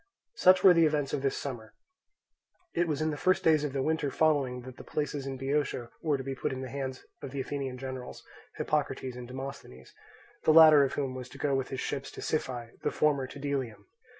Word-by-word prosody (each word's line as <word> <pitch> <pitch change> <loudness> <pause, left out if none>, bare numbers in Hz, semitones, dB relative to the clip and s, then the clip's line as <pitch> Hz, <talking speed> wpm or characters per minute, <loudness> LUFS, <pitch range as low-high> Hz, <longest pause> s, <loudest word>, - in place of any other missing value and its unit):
Such 185 - +5
were 185 - +9
the 165 -2 +5
events 150 -2 -1
of 135 - 0
this 135 -1 0
summer. 120 -6 -6 1.0
It 175 0 +1
was 155 -1 -1
in 155 - +1
the 145 - -4
first 185 0 +3
days 155 -2 +4
of 150 - -2
the 135 -1 -1
winter 155 -2 0
following 135 -4 +1
that 130 +1 -11
the - - -10
places 145 -2 -3
in 135 -1 -4
Boeotia 135 -3 -1
were 150 -3 +1
to 135 - -6
be 135 +1 -4
put 130 - -3
into 130 0 -4
the 125 - -8
hands 135 -1 -5 0.2
of 140 - -6
the 140 +1 -5
Athenian 135 -1 -3
generals, 130 -1 -7 0.3
Hippocrates 135 -4 -1
and 125 -1 -8
Demosthenes, 130 - -8 0.5
the 155 - +5
latter 155 -3 +9
of 135 - -1
whom 135 -3 -2
was 130 -1 -7
to - - -12
go 145 -2 0
with 135 -1 -1
his 130 - -4
ships 135 -1 -3
to - - -8
Siphae, 125 -6 -3
the - - 0
former 140 -3 +1
to 140 - -10
Delium. 135 -6 -3
135 Hz, 220 wpm, -30 LUFS, 130-150 Hz, 1.0 s, were